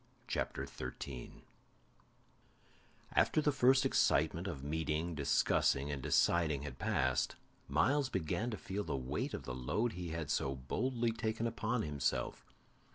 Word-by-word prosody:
CHAPTER - - -2
13 65 0 -7 1.7
After - - +3
the 150 -1 +3
first 130 0 +4
excitement 135 - +2
of 70 - -5
meeting, 80 +2 -1
discussing, 70 -1 +2
and 70 -2 -3
deciding 75 -1 +2
had 75 - -7
passed, 65 0 +1 0.3
Myles 130 - +2
began 95 - -1
to 110 - -4
feel 100 +2 -3
the 75 -6 -2
weight 65 -1 -2
of - - -6
the 65 - -5
load 105 - -1
he 90 -1 -5
had 80 -2 -3
so 70 0 0
boldly 115 - -1
taken 110 0 -2
upon 115 +1 -1
himself. 70 -5 -2
80 Hz, 135 wpm, -35 LUFS, 70-115 Hz, 1.7 s, first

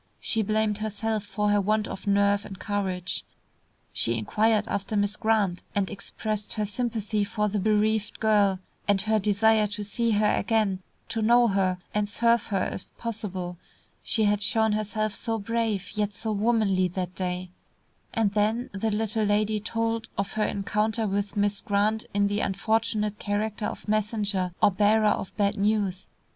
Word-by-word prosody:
She 225 - 0
blamed 215 0 0
herself 215 0 -2
for 210 0 -1
her 205 0 +3
want 215 +2 +1
of 195 - -7
nerve 200 0 +3
and 195 - -9
courage. 190 -3 -2 0.7
She 115 0 +2
inquired 215 - +1
after 200 +1 -2
Miss 205 +1 +1
Grant 215 -6 +1
and 200 -2 0
expressed 210 +1 -4
her 215 -1 -1
sympathy 215 -1 -1
for 210 +1 -1
the 210 0 -1
bereaved 215 +1 +1
girl, 205 -3 +3 0.3
and 200 -1 +3
her 215 0 +2
desire 215 +1 +3
to 205 +1 -5
see 230 +3 -1
her 210 -1 +3
again, 215 -5 +1 0.3
to 225 - -2
know 235 +2 +5
her, 190 -2 +1 0.2
and 210 -1 0
serve 235 +1 +2
her 195 -3 0
if - - -8
possible; 190 -6 -4 0.4
she 220 - +1
had 205 0 +2
shown 220 +1 +3
herself 215 0 -1
so 225 -1 -1
brave, 220 -2 -1
yet 210 -1 -2
so 220 0 -2
womanly 205 -3 +2
that 180 0 -4
day 180 -1 -3 0.6
and 225 -4 +1
then 220 +5 0
the 200 +3 -1
little 215 0 0
lady 210 +1 +1
told 225 +1 -2
of 200 0 -1
her 215 -1 +1
encounter 215 +3 0
with 200 0 -2
Miss 205 0 +1
Grant 210 +2 +1
in 200 0 +2
the 205 +1 0
unfortunate 215 +1 0
character 210 +1 -2
of - - -7
messenger 210 -3 0
or - - +7
bearer 210 +3 +3
of 195 - -1
bad 205 0 +1
news. 200 -2 0
210 Hz, 165 wpm, -26 LUFS, 200-220 Hz, 0.7 s, or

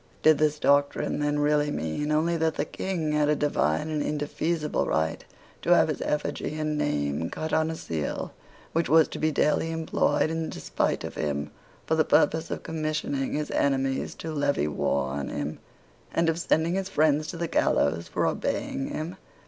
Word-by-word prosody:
Did 155 -1 +6
this 150 -1 +2
doctrine 140 0 +2
then 145 0 +1
really 150 0 +2
mean 145 - -2
only 160 +3 +2
that 160 -1 +1
the 145 - -1
King 165 -2 -2
had 150 -1 +2
a 150 - +4
divine 145 - +1
and 150 -1 0
indefeasible 150 +2 -1
right 80 +1 0 0.4
to - - +5
have - - +4
his - - -2
effigy 150 0 -2
and 155 0 -1
name 75 - -1
cut 160 0 -4
on 160 0 +2
a 160 - -3
seal 80 - -4 0.4
which 165 +1 +1
was 160 0 +6
to - - -6
be 155 0 +2
daily 150 +2 +2
employed 160 0 +1
in 160 0 -2
despite - - -1
of - - -5
him 75 -1 -2 0.3
for - - 0
the 160 0 +4
purpose 160 +1 +2
of - - -4
commissioning 155 -4 -2
his 150 0 -2
enemies 135 -1 0
to 160 - -6
levy 145 - +1
war 70 -2 0
on 70 0 -3
him, 75 +1 -4 0.5
and 165 0 +2
of 165 +1 0
sending 165 0 +1
his 195 0 -1
friends 155 0 +2
to 170 - -5
the 170 0 -2
gallows 80 - +1
for - - -1
obeying 135 - -1
him? 165 +4 -5
150 Hz, 180 wpm, -27 LUFS, 140-160 Hz, 0.5 s, Did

